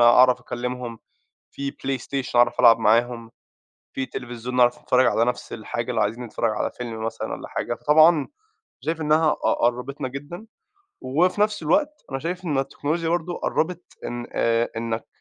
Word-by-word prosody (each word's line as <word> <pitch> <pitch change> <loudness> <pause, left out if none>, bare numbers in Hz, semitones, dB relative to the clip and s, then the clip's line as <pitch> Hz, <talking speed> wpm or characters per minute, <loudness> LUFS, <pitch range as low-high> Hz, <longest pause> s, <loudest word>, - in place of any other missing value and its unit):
أعرف 125 +2 +6
أكلّمهُم، 120 -1 -5 0.5
في 140 0 -4
PlayStation 135 -1 -3
أعرف 120 0 +4
ألعب 115 -2 +7
معاهم، 115 +1 +2 0.6
في 130 - -2
تلفزيون 120 -1 -6
نعرف 120 -1 +4
أنتفرّج 130 0 +3
على 115 -1 +3
نفْس 125 - -3
الحاجة 115 +2 -4
لو 115 -3 0
عايزين 110 +4 -1
نتفرج 115 -1 -1
على 105 - -2
فيلم 115 -2 -5
مثلًا 115 - -4
والّا - - -7
حاجة. - - -3
فطبعًا 155 +1 +5 0.5
شايف 160 0 -2
إنّها 155 +1 +3
قَ - - -7
قرّبِتنا 125 +3 -1
جدًا، 145 - -8 0.6
وفي 175 +9 +1
نفْس 210 -4 +1
الوقت 295 - +1
أنا 135 - -2
شايف 180 +4 -4
إن 150 -5 0
التكنولوجيا 155 +4 -2
برضه 175 +1 -1
قرّبت 175 +2 -1 0.2
إن، 120 0 -5
آآ، 115 0 +1
إنّك 115 0 -3
125 Hz, 160 wpm, -24 LUFS, 120-155 Hz, 0.6 s, ألعب